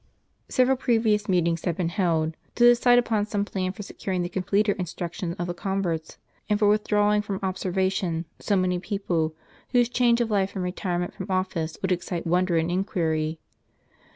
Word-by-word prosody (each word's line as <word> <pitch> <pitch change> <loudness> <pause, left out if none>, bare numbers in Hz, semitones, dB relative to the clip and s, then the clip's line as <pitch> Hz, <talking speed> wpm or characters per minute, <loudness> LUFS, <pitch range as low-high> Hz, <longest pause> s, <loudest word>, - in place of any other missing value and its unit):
Sev 255 -1 +3
eral 265 -1 +2
previous 220 -4 +2
meetings 170 -2 +1
had 175 -3 -1
been 175 -2 0
held, 165 -4 0 0.2
to 240 - +2
decide 240 0 +6
upon 220 -3 +1
some 205 -1 -1
plan 185 -3 -2
for 205 +2 -8
securing 185 -2 -3
the 175 - -3
completer 200 +3 +1
instruction 175 -1 -4
of 175 - -2
the 175 - -3
converts, 175 -4 -3 0.3
and 210 - +3
for 210 0 +3
withdrawing 210 0 +3
from 200 -2 -4
observation 185 -2 -1
so 205 - 0
many 185 -1 +1
persons, 175 -5 -1 0.4
whose 245 -1 +4
change 240 -1 +3
of 235 -2 0
life 195 -2 +1
and 190 - -2
retirement 180 -1 -2
from - - -7
office 185 -4 -1
would 190 - 0
excite 175 -1 -2
wonder 175 0 +2
and 165 +1 0
inquiry. 160 -4 -1
185 Hz, 175 wpm, -25 LUFS, 175-210 Hz, 0.4 s, decide